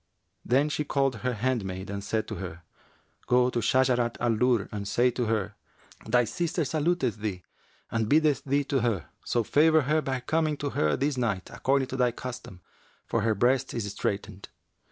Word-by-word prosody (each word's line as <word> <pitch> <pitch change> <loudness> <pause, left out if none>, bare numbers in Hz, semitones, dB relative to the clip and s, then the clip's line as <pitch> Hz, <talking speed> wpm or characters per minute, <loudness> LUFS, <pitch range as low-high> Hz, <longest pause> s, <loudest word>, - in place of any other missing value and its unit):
Then 135 +5 +3
she 150 +1 -1
called 135 -4 0
her 125 +2 -2
handmaid 100 -5 -2
and 100 0 -4
said 110 +1 -1
to - - -4
her, 85 -3 -7 0.6
'Go 125 0 +4
to 120 - -1
Shajarat 125 0 +2
al 120 -2 +1
Durr 120 -1 +2
and 100 -1 -4
say 125 +4 +3
to 120 0 -2
her, 105 -2 -1 0.5
'Thy 120 +2 +4
sister 170 +5 -1
saluteth 150 - 0
thee 100 -4 -4 0.5
and 110 -2 0
biddeth 150 -3 +3
thee 140 +1 +1
to 140 -1 0
her; 110 - -1
so 120 - 0
favour 155 +6 +4
her 150 +3 +1
by 135 -3 -2
coming 155 +2 0
to 145 -1 -3
her 75 -1 +1
this 140 +1 0
night, 105 -7 -2
according 135 -1 +1
to 130 - -4
thy 125 -1 +3
custom, 120 -6 -8 0.4
for 115 - 0
her 110 0 +1
breast 125 +5 +1
is 115 -3 -2
straitened.' 100 0 -4
125 Hz, 180 wpm, -27 LUFS, 110-140 Hz, 0.6 s, Go